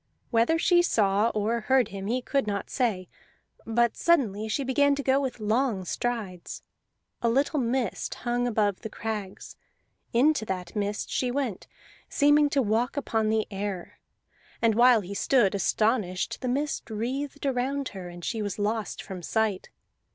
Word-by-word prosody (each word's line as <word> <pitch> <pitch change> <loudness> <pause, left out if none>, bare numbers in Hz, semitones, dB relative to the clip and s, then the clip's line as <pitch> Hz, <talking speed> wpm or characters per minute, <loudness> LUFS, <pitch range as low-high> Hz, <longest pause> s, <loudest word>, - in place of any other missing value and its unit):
Whether 235 +7 +3
she 345 +1 +4
saw 210 - +2
or 215 +3 0
heard 260 0 +2
him 195 0 -6
he 250 +3 -1
could 275 -4 0
not 200 -1 -3
say, 210 -8 0 0.6
but 235 +1 +2
suddenly 220 - +2
she 220 +6 -1
began 280 +2 +3
to 280 - -4
go 265 +2 +3
with 260 -3 -3
long 215 -2 0
strides. 205 -4 -4 0.6
A 235 - +2
little 280 +5 +1
mist 245 -3 -1
hung 245 0 -1
above 210 -4 0
the 220 - -5
crags; 210 -3 -6 0.6
into 275 +2 +3
that 180 -2 -5
mist 205 0 -2
she 250 - 0
went, 250 -6 -3 0.4
seeming 290 0 +4
to 280 -2 +2
walk 230 +6 0
upon 225 -6 0
the 220 0 +1
air; 195 -2 -5 0.6
and 230 -1 +3
while 240 0 +6
he 195 +1 -7
stood 220 -1 +3
astonished 200 -1 0
the 255 - -2
mist 285 +2 -2
wreathed 265 +7 -3
around 270 +1 -1
her, 185 -3 -8
and 175 -1 -9
she 225 - -2
was 205 -2 -3
lost 215 +1 -2
from 190 -3 -7
sight. 210 +1 -1
230 Hz, 160 wpm, -27 LUFS, 205-265 Hz, 0.6 s, while